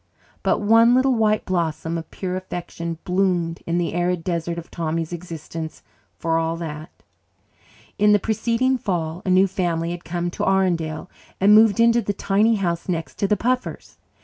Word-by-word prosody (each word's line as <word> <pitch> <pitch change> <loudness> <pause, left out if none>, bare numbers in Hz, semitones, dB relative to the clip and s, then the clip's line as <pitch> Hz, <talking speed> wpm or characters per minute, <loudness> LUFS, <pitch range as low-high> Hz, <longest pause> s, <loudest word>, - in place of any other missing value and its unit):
But - - +1
one 230 +3 +5
little 260 +1 +3
white 215 -2 +1
blossom 165 -2 -1
of 165 -1 -5
pure 185 -1 -4
affection 175 -2 -5
bloomed 180 -3 0
in 170 +1 0
the 175 -2 -1
arid 175 0 0
desert 170 -1 -2
of 170 - -8
Tommy's 165 0 -3
existence 165 -2 -7 0.3
for 165 0 0
all 165 0 -1
that. 155 -1 -6 1.1
In 210 +1 +5
the 205 - +6
preceding 230 +5 0
fall 170 -4 -2
a - - +1
new 185 +1 +5
family 170 -3 -1
had 175 0 -6
come 175 +1 -3
to - - -4
Arundel 175 -5 0 0.3
and 200 +2 +6
moved 220 0 +6
into 235 +1 +5
the 205 -1 -2
tiny 205 +3 +2
house 175 -3 -2
next 165 -2 -3
to 200 - +1
the 210 - +2
Puffers'. 250 +5 -2
180 Hz, 170 wpm, -22 LUFS, 165-205 Hz, 1.1 s, the